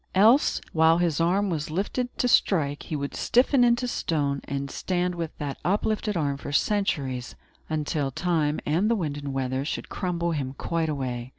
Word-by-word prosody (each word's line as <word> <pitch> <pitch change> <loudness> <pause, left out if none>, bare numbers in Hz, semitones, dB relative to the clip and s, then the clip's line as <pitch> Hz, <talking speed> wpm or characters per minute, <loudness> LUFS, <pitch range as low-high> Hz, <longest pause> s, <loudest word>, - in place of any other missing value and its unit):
Else, 225 +9 +5
while 160 +1 +5
his 170 -3 +1
arm 190 +4 +2
was 155 -2 -2
lifted 205 +9 -2
to 250 - +1
strike, 150 -11 +2
he 155 - -5
would 140 -1 -3
stiffen 250 +1 +3
into 240 +1 +3
stone, 145 - -1
and 140 0 -4
stand 180 -1 -1
with 170 -2 -5
that 145 -2 -4
uplifted 210 +1 0
arm 140 -3 0
for 140 - -7
centuries, 140 - 0 0.3
until 150 -2 -1
time, 160 -1 0
and 175 +8 +2
the 235 - +3
wind 155 -8 -2
and 145 -1 -5
weather, 130 0 -1
should 145 - -4
crumble 170 -2 -2
him 140 -4 -3
quite 165 -1 -1
away. 130 -4 -3
160 Hz, 175 wpm, -26 LUFS, 140-190 Hz, 0.3 s, Else